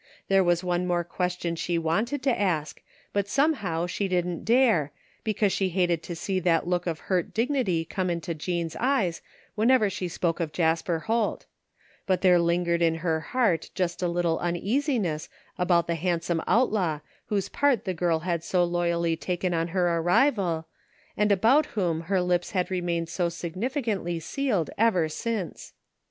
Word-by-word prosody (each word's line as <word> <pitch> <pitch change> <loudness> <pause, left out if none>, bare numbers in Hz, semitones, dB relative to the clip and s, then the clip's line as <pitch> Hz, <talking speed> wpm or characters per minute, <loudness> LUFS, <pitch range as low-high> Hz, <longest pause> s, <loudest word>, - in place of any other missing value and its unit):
There 195 -1 +5
was 175 0 +2
one 180 0 0
more 175 -1 +1
question 175 0 -2
she 170 +1 -1
wanted 215 - -1
to 265 -3 +1
ask, 155 -7 -1 0.3
but 200 -1 0
somehow 205 - +1
she 195 +3 -2
didn't 180 -2 -1
dare, 225 - +3 0.3
because 210 -2 +1
she 190 -1 0
hated 175 -2 +1
to 170 +1 -6
see 185 +3 -2
that 170 -2 +2
look 180 0 -1
of 160 -2 -3
hurt 180 -3 -1
dignity 225 - +1
come 185 +2 -2
into 170 0 -2
Jean's 165 +1 -3
eyes 230 -10 +1 0.3
whenever 220 -1 +3
she 185 - -3
spoke 170 0 -1
of 160 -3 -2
Jasper 165 0 +1
Holt; 225 +2 -1 0.6
but 185 -2 +1
there 180 -2 +5
lingered 170 0 +1
in 165 -1 +3
her 160 -2 +1
heart 185 -2 0
just 180 -1 -1
a 180 - +1
little 170 -1 0
uneasiness 190 - -1 0.3
about 175 -1 +3
the 170 - -1
handsome 170 0 -1
outlaw 200 - +2 0.3
whose 200 -2 -1
part 280 -6 +1
the 185 - -1
girl 165 -2 0
had 170 -2 -2
so 180 0 +2
loyally 170 -1 0
taken 180 +2 -2
on 165 0 0
her 175 -1 +1
arrival, 175 - +2 0.5
and 210 0 +2
about 230 +10 +4
whom 170 -5 0
her 190 -2 +2
lips 180 -1 0
had 185 -1 0
remained 175 -2 -1
so 175 +1 -1
significantly 185 - -3
sealed 210 - -1
ever 185 -8 +3
since. 210 +2 -4
180 Hz, 165 wpm, -26 LUFS, 170-200 Hz, 0.6 s, There